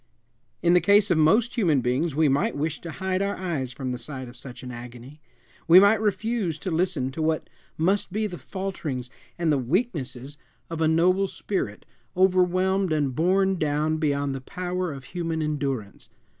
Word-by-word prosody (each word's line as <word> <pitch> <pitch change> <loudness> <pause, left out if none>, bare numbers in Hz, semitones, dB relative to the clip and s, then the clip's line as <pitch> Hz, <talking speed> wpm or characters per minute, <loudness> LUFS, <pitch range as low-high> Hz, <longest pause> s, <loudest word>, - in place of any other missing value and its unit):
In 175 0 +5
the 180 - +5
case 200 +3 +4
of 170 - +3
most 215 +10 +4
human 175 - +2
beings 130 +5 0
we 155 0 +4
might 140 +1 +1
wish 155 +1 -2
to 170 - -7
hide 190 +2 -1
our 200 0 0
eyes 160 -9 -3
from 130 0 -4
the 125 - -4
sight 130 -3 -6
of 120 - -12
such 125 0 -10
an 125 - -6
agony; 125 +4 -10 0.5
we 170 +3 +9
might 205 +2 +5
refuse 210 -4 -1
to 185 - -4
listen 160 -6 0
to 160 - -5
what 155 0 0 0.3
must 190 +5 +1
be 215 +3 -1
the 180 -5 -5
falterings 155 -10 -5 0.3
and 170 -2 +1
the 145 - +2
weaknesses 140 - -2 0.3
of 165 -1 -3
a 160 - +4
noble 180 +5 +3
spirit 185 - -4 0.3
overwhelmed 185 0 +3
and 145 -4 +1
borne 190 +3 +2
down 155 +1 0
beyond 145 -3 0
the 135 - -5
power 180 +4 -3
of 135 -2 -8
human 165 +2 -3
endurance. 135 -9 -3
160 Hz, 180 wpm, -25 LUFS, 140-185 Hz, 0.5 s, we